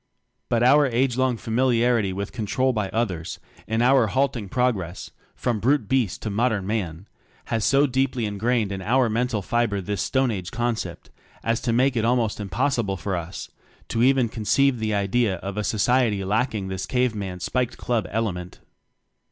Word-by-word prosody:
But 120 0 +2
our 145 +3 +6
age 125 0 +1
long 130 -2 +1
familiarity 115 -3 +1
wjth 100 +2 -4
"control 130 +4 0
by 105 -4 -1
others," 95 -7 -2 0.3
in 110 +1 +1
our 130 -2 +5
halting 120 -3 -1
progress, 100 -8 -1 0.2
from 120 -3 -1
brute 125 +1 +2
beast 125 -5 0
to 110 - -2
modern 110 -2 0
Man, 95 -4 -3 0.5
has 115 -1 +1
so 140 +2 +4
deeply 130 -3 0
ingrained 105 +1 0
in 95 -1 -4
our 120 +3 +2
mental 115 -2 0
fiber 120 -2 0
this 100 -1 -3
stone 130 - +1
age 90 -4 -4
concept 120 +2 -3 0.3
as 115 0 0
to 120 - 0
make 130 +3 +2
it 115 - +1
almost 115 -2 +1
impossible 110 -1 -1
for 95 +3 -3
us 85 +2 -6 0.4
to 115 - 0
even 130 -1 +4
conceive 120 +4 +1
the 110 -1 -1
idea 100 +1 +1
of 95 +2 -6
a 105 - -1
society 110 -1 +2
lacking 105 0 -1
this 95 0 -4
cave 125 -2 +1
man 95 -4 -5
spiked 125 +6 -1
club 115 -6 -1
element. 95 -5 -3
115 Hz, 170 wpm, -24 LUFS, 100-125 Hz, 0.5 s, our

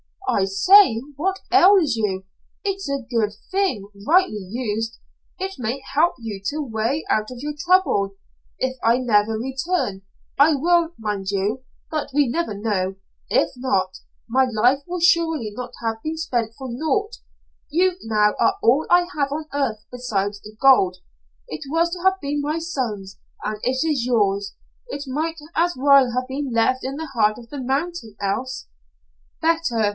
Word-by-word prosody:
"I 190 - +2
say, 230 - +6 0.2
what 380 +5 -1
ails 370 - +6
you? 195 -4 -1 0.4
It's 390 -5 -2
a 280 -2 -2
good 225 -4 0 0.2
thing, 370 - 0 0.2
rightly 355 - +3
used. 225 0 -3 0.4
It 385 0 -4
may 245 +3 -3
help 320 +5 +3
you 215 -4 -6
to 285 - -1
a 305 - -2
way 230 +7 -1
out 215 0 +1
of 250 - -8
your 295 +1 -3
trouble. 315 - +2 0.4
If 260 0 -2
I 230 +2 +4
never 225 -4 +2
return 265 - -2 0.4
I 295 +2 +6
will, 340 +3 +2
mind 205 -3 -3
you, 205 +6 -1 0.3
but 310 -2 -2
we 290 -2 +4
never 245 -5 -1
know 195 -3 -1 0.3
if - - +2
not, 190 -8 0 0.3
my 260 +3 +3
life 245 +4 +3
will 355 0 -4
surely 325 -9 +2
not 245 +2 -7
have 225 -1 -2
been 315 +4 -4
spent 240 -9 -1
for 265 -2 -6
naught. 410 - -1 0.5
You, 360 +4 +2
now, 210 -1 +2
are 390 - +3
all 275 +7 +4
I 350 0 +5
have 280 -2 0
on 305 +1 -4
earth 230 -7 -1
besides 205 -5 -2
the 210 +1 -12
gold. 225 -10 +5 0.5
It 155 - -6
was 335 +3 +1
to 360 - -4
have 380 0 +3
been 290 0 -2
my 300 +3 -1
son's, 235 - -4 0.2
and 210 0 -3
it 260 +4 0
is 290 -7 0
yours. 200 -4 +1 0.3
It 290 -11 -5
might 315 +5 -2 0.2
as 350 +2 +2
well 275 -2 +5
have 255 +1 -1
been 270 0 -4
left 245 +3 +2
in 270 +1 -3
the 315 0 -6
heart 215 -3 +2
of 235 -1 -13
the 285 -2 -6
mountain, 270 - -2
else." 245 +7 -3 0.7
"Better. 320 -10 +2
260 Hz, 165 wpm, -22 LUFS, 215-320 Hz, 0.7 s, say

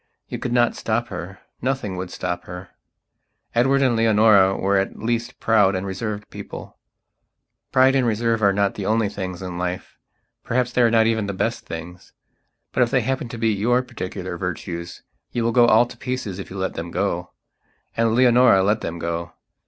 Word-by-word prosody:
You - - -5
could 125 - -3
not 120 -1 +3
stop 115 +2 -1
her; 90 +1 -7 0.2
nothing 130 -7 -2
would 90 0 -5
stop 90 0 -4
her. 90 +1 -9 0.8
Edward 135 +3 +3
and 125 -3 +3
Leonora 105 -4 +5
were 100 +1 +2
at 95 - -3
least 120 +2 -2
proud 105 -4 +3
and 95 +1 -3
reserved 105 +2 -4
people. - - -9 0.9
Pride 130 +1 +5
and 130 -3 +2
reserve 115 0 0
are 100 -1 +5
not 100 0 +1
the 100 - -5
only 110 -1 +2
things 95 -2 -6
in 90 -1 -5
life; 90 0 -4 0.4
perhaps 125 0 0
they 125 - +2
are 120 - +5
not 115 -1 +4
even 110 -2 +1
the 100 - -3
best - - -2
things. 85 +2 -8 0.6
But - - 0
if 120 - +4
they 130 +1 +2
happen 130 +1 -2
to 115 - -7
be 115 0 +1
your 120 +5 +1
particular 95 -7 -6
virtues 85 -1 -5 0.3
you 120 - 0
will 115 - +1
go 120 0 +5
all 115 +1 +5
to - - -12
pieces 125 -7 -4
if 100 - -7
you 100 - -8
let 95 0 -2
them 85 +1 -5
go. 90 -1 -2 0.7
And 115 -1 +2
Leonora 125 -5 +5
let 105 +3 +1
them 85 - -4
go. 85 0 -4
105 Hz, 190 wpm, -22 LUFS, 95-120 Hz, 0.9 s, Leonora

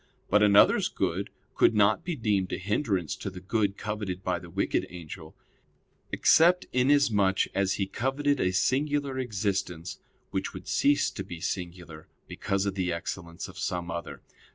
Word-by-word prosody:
But 105 +2 +5
another's 100 -1 +5
good - - -2 0.2
could 115 - +3
not 105 +7 +3
be 175 -1 -3
deemed 105 -7 0
a - - -1
hindrance 100 - -1
to - - -5
the 95 -1 -9
good 100 +1 -1
coveted 100 -4 -4
by 90 -1 -1
the 85 -1 -12
wicked 95 +1 -1
angel, 85 -2 -10 0.8
except 175 +3 +4
inasmuch 125 -8 +3
as 100 0 +1
he 100 - -1
coveted 135 +7 -1
a 90 - +2
singular 135 +7 0
excellence, 100 -7 -3 0.3
which - - -3
would - - -9
cease 145 -1 +2
to 130 - -6
be 85 -2 -8
singular 85 -3 -5 0.2
because 100 0 -2
of 100 - -1
the 90 -2 -1
excellence 85 0 -5
of - - -11
some 85 -1 -3
other. 85 -1 -6
100 Hz, 155 wpm, -28 LUFS, 90-125 Hz, 0.8 s, But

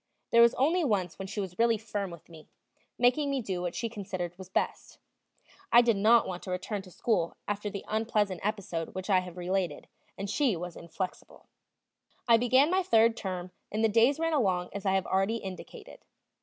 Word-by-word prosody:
There 235 - +6
was 235 0 +6
only 330 +7 +2
once 195 - -1
when 195 - -5
she 205 +2 -5
was 190 -1 -5
really 230 -1 +4
firm 205 -2 -4
with 170 -3 -12
me, 160 -2 -15 0.5
making 255 +4 +3
me 275 -1 0
do 190 -6 -3
what 175 -1 -3
she 230 - -2
considered 190 -5 -5
was 185 0 -11
best; 190 - -2 0.7
I 240 +1 +8
did 230 -2 +3
not 220 +4 +5
want 180 -1 -5
to - - -9
return 185 +3 -3
to 190 - -14
school 180 -3 -1
after 205 0 -2
the 200 -1 -7
unpleasant 215 -4 0
episode 190 -6 -3
which 190 +2 -3
I 185 - +5
have 180 -1 -8
related, 180 -3 -2 0.3
and 195 - -4
she 245 +1 +1
was 175 0 -6
inflexible. 175 +3 -7 0.8
I 230 -1 +7
began 255 +6 +4
my 375 +1 +3
third 230 -8 +4
term, 185 -3 -5 0.2
and 215 +2 -1
the 225 - +4
days 235 +6 +4
ran 330 0 0
along 185 -10 +1
as 200 0 -4
I 190 - +3
have 190 - +1
already 195 +4 +1
indicated. 190 -5 -8
200 Hz, 195 wpm, -29 LUFS, 185-230 Hz, 0.8 s, I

